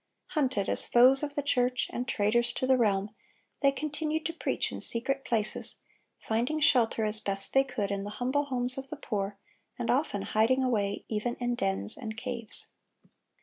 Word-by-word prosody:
Hunted 260 - 0
as - - -1
foes 255 +3 +6
of 290 -1 -4
the 290 - -1
church 250 -2 +1
and 250 +1 -3
traitors 235 +2 +2
to - - -1
the 260 0 +5
realm, 205 -4 +1 0.5
they 275 -2 +5
continued 305 +2 -2
to 330 - -1
preach 335 - -1
in - - -5
secret 270 +4 -1
places, 215 -4 -1 0.4
finding 240 +8 -1
shelter 235 -6 +3
as 215 0 +2
best 195 -1 0
they 270 - +6
could 245 -7 -3
in 200 0 -2
the 205 - -5
humble 265 +4 +1
homes 255 -1 -1
of 270 - -9
the 305 - -5
poor, 200 -5 -3 0.4
and 240 - 0
often 245 -7 0
hiding 250 +5 +2
away 205 -5 0
even 225 +2 -2
in 245 0 -1
dens 100 - -1
and 220 0 -6
caves. 235 -2 -4
245 Hz, 180 wpm, -29 LUFS, 215-270 Hz, 0.5 s, foes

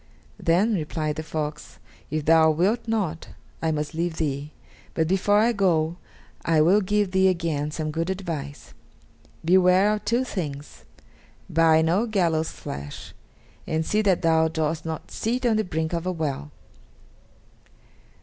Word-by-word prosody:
"Then," 190 +7 +2
replied 155 -3 -2
the - - -2
fox, 150 -1 -5 0.3
"if 155 -1 -2
thou 160 0 +6
wilt 195 +10 +1
not, 195 -8 -2 0.3
I 160 - 0
must 150 0 -2
leave 165 0 -2
thee; 145 -1 -2 0.4
but 160 -1 +1
before 195 +3 +2
I 225 +3 +4
go 175 -6 +1 0.5
I 165 -2 +2
will 180 +7 +5
give 205 0 0
thee 190 0 +4
again 165 -5 0
some 155 0 -3
good 165 +3 -2
advice. 165 -7 -5 0.7
Beware 185 +3 +5
of 210 - -4
two 240 +3 +1
things 150 - -6 0.6
buy 160 0 +4
no 185 +9 +1
gallows' 170 -7 +1
flesh, 70 +1 -8 0.5
and 160 0 -1
see 210 +5 +1
that 190 -4 +1
thou 160 -1 +4
dost 160 0 -2
not 160 -1 -6
sit 245 +3 -2
on 225 -3 +3
the 215 - +1
brink 160 -2 -3
of 170 +1 -2
a - - +1
well!" 145 - -3
165 Hz, 150 wpm, -24 LUFS, 155-190 Hz, 0.7 s, thou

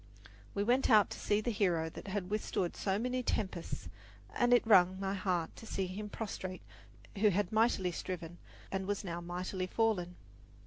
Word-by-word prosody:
We 200 - +1
went 245 +5 +3
out 215 -4 +6
to - - -6
see 205 +1 +1
the 240 - -1
hero 180 -7 +1
that 160 - -9
had 195 -1 -3
withstood 205 -4 -1
so 195 -1 0
many 250 +3 -1
tempests, 185 - -2 0.5
and 245 0 +2
it 245 -1 +5
wrung 185 -3 +6
my 195 0 -1
heart 185 -4 -1
to 225 - -10
see 195 - -1
him 205 +3 -5
prostrate 190 -4 -5 0.6
who 210 +1 +6
had 200 -1 0
mightily 215 -5 +2
striven 175 -1 -5 0.3
and 190 0 -2
was 205 0 -1
now 175 -2 -4
mightily 185 +2 -3
fallen. 185 -5 0
195 Hz, 175 wpm, -34 LUFS, 180-215 Hz, 0.6 s, out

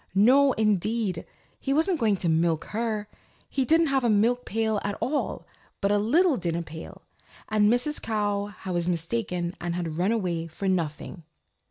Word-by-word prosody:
No 260 +7 +5
indeed. 215 -3 0 0.3
He 275 0 -1
wasn't 325 +2 +2
going 220 -4 +3
to 180 - -1
milk 165 0 +1
her. 215 -2 -2 0.4
He 265 - -1
didn't 325 +5 +4
have 265 -1 +2
a 240 - +2
milk 230 +4 +2
pail 220 -1 0
at 205 0 -3
all, 290 +3 -2 0.3
but 200 -1 +1
a 205 - +3
little 295 - +3
dinner 170 -2 -2
pail, 160 0 -10 0.5
and 215 0 +3
Mrs. 250 +5 0
Cow 205 -2 -1
was 175 -2 -1
mistaken 175 0 -2
and 175 -1 -2
had 170 -2 -3
run 190 +4 +2
away 175 -7 -1
for 170 +5 -5
nothing. 170 -1 -2
205 Hz, 165 wpm, -26 LUFS, 175-235 Hz, 0.5 s, No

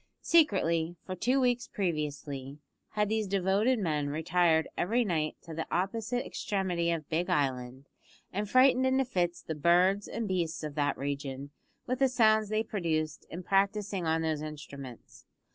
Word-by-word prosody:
Secretly, 175 - +3
for 185 - -4
two 250 +9 +1
weeks 245 -2 +1
previously, 145 -6 -3 0.4
had 210 -1 +1
these 220 0 0
devoted 200 +6 +2
men 150 -8 -1
retired 160 +1 +2
every 230 +6 +1
night 155 -5 -1
to 165 - -9
the 160 +1 -4
opposite 225 +6 -1
extremity 180 -4 -1
of 165 -3 -2
Big 175 +3 -1
Island, 130 -4 -1 0.5
and 205 +1 -2
frightened 255 +1 +5
into 265 +1 +2
fits 175 -7 -1
the 160 - -4
birds 180 +6 +3
and 230 -1 -3
beasts 175 -4 -2
of 150 -1 -4
that 145 -1 0
region 140 0 -4 0.3
with 255 +1 -2
the 270 -1 +4
sounds 220 -4 +3
they 215 +1 +1
produced 160 -8 -2
in 175 +3 -7
practising 195 -1 0
on 160 0 +1
those 155 -2 -1
instruments. 140 -5 -9
175 Hz, 155 wpm, -30 LUFS, 155-210 Hz, 0.5 s, frightened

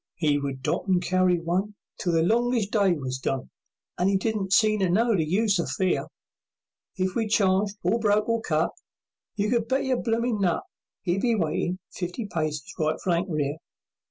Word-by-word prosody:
'E 150 -3 +2
would 135 -2 -4
dot - - -1
and 185 -2 +3
carry 185 -1 +2
one 185 +5 -1 0.2
Till 175 - 0
the 165 0 +3
longest 230 +1 +1
day 200 -4 +3
was 130 -4 -4
done, 135 0 -3 0.5
And 180 +2 +3
'e 195 - +3
didn't 200 -1 -2
seem 215 +1 +4
to 190 -2 +2
know 225 +5 +3
the 165 - +2
use 195 +4 +1
of 170 - -1
fear; 185 -1 0 0.9
If 185 -1 -1
we 225 -2 0
charged 200 -1 +2
or 195 +7 +2
broke 210 -1 +2
or 230 0 +1
cut, 160 -4 0 0.6
You 210 0 0
could 235 -2 +1
bet 265 +3 +1
your 260 -1 +1
bloomin' 230 -2 0
nut 175 -4 +1 0.4
'E'd 180 +2 +1
be 235 -2 +2
waitin' 175 0 -1
fifty 180 +5 -4
paces 155 -5 -3
right 155 0 0
flank 175 +1 0
rear. 150 -2 -1
190 Hz, 185 wpm, -26 LUFS, 170-215 Hz, 0.9 s, seem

